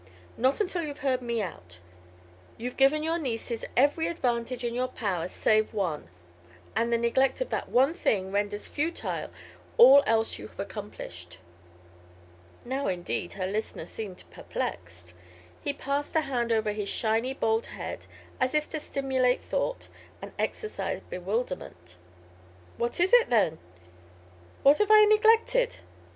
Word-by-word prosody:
"Not 260 +3 +2
until 365 -4 0
you've 295 -3 -6
heard 255 -2 +2
me 235 -3 -1
out. 90 - -8 0.8
You've 245 +2 -5
given 275 +3 +4
your 325 +2 0
nieces 235 -4 -3
every 290 +5 +3
advantage 250 -6 -2
in 235 -1 -1
your 250 +1 0
power 190 -10 -2
save 215 +3 +1
one, 170 - -2 0.7
and 235 +1 +1
the 235 - +3
neglect 235 - +2
of - - -3
that - - -2
one 270 +5 +4
thing 190 - 0
renders 205 +1 -2
futile 320 +3 -3 0.5
all 270 +4 +9
else 225 0 +1
you - - -8
have - - -21
accomplished." 190 - -7 1.3
Now, 265 +3 -2
indeed, 175 -1 -3
her 190 -1 -3
listener 210 +4 -3
seemed 200 -5 -7
perplexed. 90 0 -5 0.5
He - - -1
passed 280 +2 -3
a 320 - +5
hand 245 -5 -1
over 220 -1 +2
his 205 -1 -3
shiny 230 +4 0
bald 225 -2 +1
head - - -7 0.3
as 255 +3 +1
if 300 0 +1
to 315 - -3
stimulate 265 -3 +1
thought - - -2 0.3
and - - -8
exorcise 435 -2 -3
bewilderment. 180 - -4 0.8
"What 240 +5 -1
is 365 +6 +2
it, - - +7
then? 195 -9 +2 1.0
What 285 +2 +6
have 420 -1 +2
I 430 0 +8
neglected?" 455 +3 +4
240 Hz, 140 wpm, -28 LUFS, 205-285 Hz, 1.3 s, all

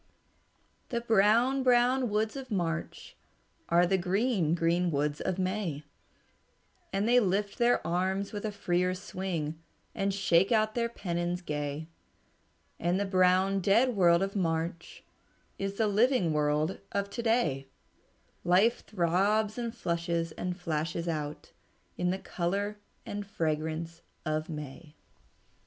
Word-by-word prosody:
"The 235 -1 -1
brown, 230 +4 +3
brown 250 0 +3
woods 215 +3 0
of 270 -1 -7
March 170 -5 -3 0.5
Are 175 +1 +5
the 190 +1 +2
green, 190 -2 +1
green 170 +1 +1
woods 145 -1 -1
of 185 -1 -1
May, 185 -5 -2 1.1
And 195 +3 0
they 245 +1 +6
lift 200 -1 0
their 240 0 +3
arms 190 +4 -1
with 205 - -4
a 215 - -2
freer 180 -2 0
swing 175 -5 -4 0.3
And 195 0 0
shake 190 -1 +3
out 215 -1 +3
their 235 0 0
pennons 175 -4 -3
gay. 150 0 -3 0.9
And 175 +3 +1
the 200 - 0
brown, 185 +1 +3
dead 225 +6 +3
world 175 -2 +4
of 195 +1 -3
March 170 -2 -2 0.6
Is 195 0 -2
the 220 - +1
living 210 - +3
world 150 +3 +1
of 200 0 -2
to 235 - -3
day; 165 - +1 0.8
Life 195 +7 +3
throbs 205 +3 +1
and 235 -1 -2
flushes 170 -5 -2
and 180 +3 -4
flashes 165 0 -2
out 150 -2 -4 0.4
In 180 - 0
the 185 - 0
color 200 +4 -2 0.3
and 205 0 -4
fragrance 160 -2 -3 0.2
of 155 0 -1
May." 150 0 -8
185 Hz, 130 wpm, -30 LUFS, 165-210 Hz, 1.1 s, they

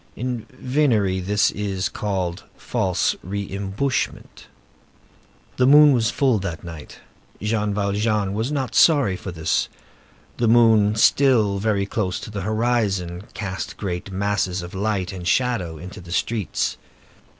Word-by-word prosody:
In 125 -2 -4
venery 125 -8 +1
this 105 +4 +1
is 100 -2 -2
called 95 -3 -3
false 95 -7 0
re 100 +2 -4
imbushment. 100 +7 -3 1.1
The 125 - +4
moon 150 +1 +8
was 115 -3 +2
full 130 -5 +2
that 85 -5 -5
night. 80 -4 -9 0.4
Jean 105 0 -1
Valjean 100 0 0
was 110 +6 -2
not 135 -4 -2
sorry 140 - +4
for 95 - -7
this. 80 -1 0 0.7
The 120 - +1
moon, 110 -2 +5
still 110 -4 +3
very 100 -1 0
close 100 -1 -2
to - - -8
the 100 -1 -4
horizon, 105 -4 -1
cast 95 -3 -5
great 90 -1 -4
masses 95 -2 -1
of 85 - -9
light 95 -2 -2
and 90 -2 -6
shadow 95 -9 0
in 90 +4 -8
the 90 -3 -11
streets. 105 +1 -1
105 Hz, 135 wpm, -22 LUFS, 95-115 Hz, 1.1 s, moon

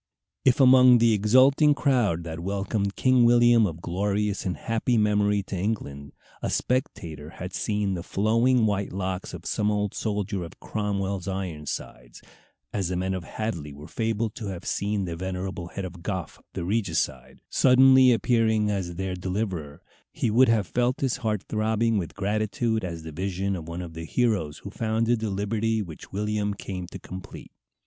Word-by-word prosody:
If, 130 0 +4
among 130 -1 +8
the 115 -1 +4
exulting 130 +8 +5
crowd 120 - +1
that 80 0 -6
welcomed 100 +2 -2
King 130 -1 +4
William 120 -2 +5
of 85 -1 -7
glorious 100 +3 -1
and 90 - -2
happy 115 +1 0
memory 105 -1 +2
to 95 - -6
England, 70 -8 -3 0.3
a - - -2
spectator 80 - -2
had 90 +1 -6
seen 105 -2 -1
the 90 - -3
flowing 115 +6 +2
white 100 -2 -1
locks 95 0 -3
of - - -9
some 105 - 0
old 105 -1 0
soldier 105 -3 -2
of 85 - -11
Cromwell's 100 -3 -2
Ironsides, 75 -10 -5 0.5
as 100 -4 -1
the 90 - -2
men 95 +1 -1
of 95 -2 -4
Hadley 85 -8 -4
were 75 +2 -11
fabled 110 -1 -1
to 110 - -5
have 95 -3 -6
seen 100 0 -1
the 85 -2 -4
venerable 95 0 -4
head 95 +2 -5
of 90 -1 -9
Goffe, 95 -4 -4
the 95 - -4
regicide, 80 - -1
suddenly 130 0 +6
appearing 110 -3 +2
as 90 -4 -3
their 95 +1 -3
deliverer, 90 -5 -4 0.3
he 110 - -1
would 125 +3 +5
have 110 -3 +3
felt 125 +7 0
his 135 -2 0
heart 110 -6 -2
throbbing 110 0 +1
with 85 - -6
gratitude 110 +2 -1
at 85 -3 -5
the 80 - -7
vision 95 +4 -2
of 80 -3 -7
one 85 +2 -5
of 85 -2 -9
the 80 0 -6
heroes 100 -9 0
who 100 - -7
founded 115 +2 0
the 110 -1 -2
liberty 110 +3 -1
which 80 -5 -11
William 105 0 -1
came 90 -2 -6
to 95 - -8
complete. 95 0 -10
100 Hz, 170 wpm, -26 LUFS, 90-110 Hz, 0.5 s, among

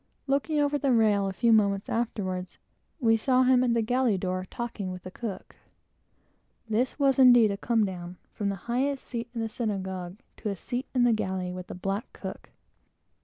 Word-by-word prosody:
Looking 285 +3 0
over 290 0 +1
the 275 -2 +1
rail 210 -4 +3
a - - -1
few 230 +5 +3
moments 200 -2 +2
afterward, 185 -6 -3 0.4
we 225 -4 +4
saw 255 +3 +3
him 255 0 +4
at 240 -2 +2
the 230 - +2
galley 245 -2 +2
door 185 0 -3
talking 225 -5 -4
to 180 - -6
the 185 - -8
cook. 215 -1 -7 1.1
This 230 +4 0
was 275 -2 +3
a - - +8
great 225 -5 +6
comedown, 190 -6 -1 0.2
from 205 -1 -2
the 200 - -2
highest 265 +3 -1
seat 235 -1 -5
in 230 - -2
the 225 - -1
synagogue 190 -5 -4 0.2
to 215 - -3
a 200 - -2
seat 245 +8 -4
in 250 - +4
the 240 -1 +4
galley 190 -4 -2
with 180 0 -7
the - - -7
black 195 +5 -3
cook. - - -8
220 Hz, 185 wpm, -28 LUFS, 190-245 Hz, 1.1 s, a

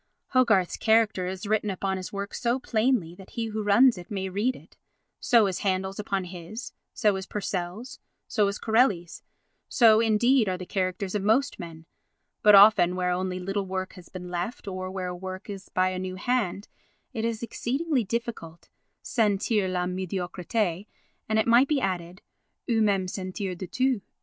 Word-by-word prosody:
Hogarth's 220 -9 +3
character 220 -5 +2
is 190 +2 -5
written 210 0 0
upon 190 0 -2
his 185 -1 -6
work 200 0 -5
so 240 +1 0
plainly 225 -8 0
that 190 +1 -14
he 230 - -3
who 215 0 -3
runs 210 +2 +5
may 190 -2 -3
read 215 +7 0
it, - - -16 0.4
so 235 -4 +4
is 190 -2 -2
Handel's 190 0 -1
upon 195 -2 -2
his, 180 +5 -8 0.2
so 210 -5 +2
is 190 - -6
Purcell's, 205 +4 -4 0.3
so 210 -2 +2
is 200 +1 -2
Corelli's, 220 -7 +1 0.5
so, 225 -4 +6
indeed, 230 +1 +3
are 185 - -1
the 185 - -7
characters 185 +1 -2
of 210 - 0
most 220 +7 +1
men; 165 -2 -9 0.6
but 210 -1 +7
often 195 -3 +7
where 180 0 0
only 185 0 -2
little 195 +2 -3
work 185 0 -4
has 180 -2 -14
been 180 -1 -8
left, 180 +6 -4
or 185 -1 -4
where 185 -1 -4
a 180 - -5
work 185 +3 -7
is 195 -1 -9
by 185 0 +1
a 185 0 -4
new 185 0 -4
hand, 205 -2 -1 0.5
it 225 -3 -3
is 230 0 -2
exceedingly 270 +4 -1
difficult 210 -7 -5 0.3
"sentir 210 -3 +1
la 180 -1 0
médiocrité" 185 +1 -2 0.4
and, 220 - +2
it 220 - +3
might 235 +3 +5
be 295 -1 +1
added, 180 -3 -3 0.4
"ou 230 -3 +2
même 195 -3 +2
sentir 185 +1 -4
du 185 +1 -7
tout." 255 +1 0
200 Hz, 175 wpm, -26 LUFS, 185-225 Hz, 0.6 s, but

